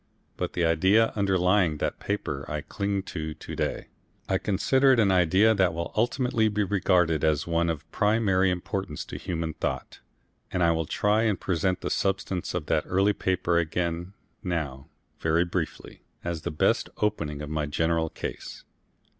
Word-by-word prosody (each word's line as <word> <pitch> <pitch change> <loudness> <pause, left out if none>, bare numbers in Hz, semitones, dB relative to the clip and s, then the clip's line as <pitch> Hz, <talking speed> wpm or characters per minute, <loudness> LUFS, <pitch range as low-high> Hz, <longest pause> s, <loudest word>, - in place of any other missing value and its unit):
But - - -3
the 85 - +1
idea 95 +8 +4
underlying 95 -4 +2
that - - -2
paper 75 -9 -3
I 75 0 -3
cling 100 +6 -2
to 80 -4 -5
to - - -8
day. - - -3 0.4
I - - +1
consider 130 +7 +3
it 125 - +2
an 100 -3 +4
idea 95 +5 +4
that 95 -5 +2
will 85 0 -4
ultimately 120 0 +1
be 105 0 0
regarded 90 -5 +2
as 75 -2 +2
one 85 0 +1
of 80 -1 -4
primary 105 -3 +2
importance 90 -2 -3
to - - -7
human 85 -3 -3
thought, - - -4 0.5
and 90 - +1
I 85 - +5
will 80 -1 -1
try 105 +1 +2
and 105 -4 +1
present 90 0 0
the - - -3
substance 95 -2 -1
of 85 -4 -2
that 80 0 +1
early 100 +3 +3
paper 90 -3 +1
again 85 +2 -2 0.3
now 75 -7 -3 0.3
very 80 +2 +2
briefly, 85 -2 -4 0.2
as 85 -2 -3
the - - -3
best 75 - +1
opening 75 -9 -1
of 75 - -6
my 75 -1 -1
general 80 +2 0
case. - - -7
90 Hz, 165 wpm, -27 LUFS, 80-100 Hz, 0.5 s, I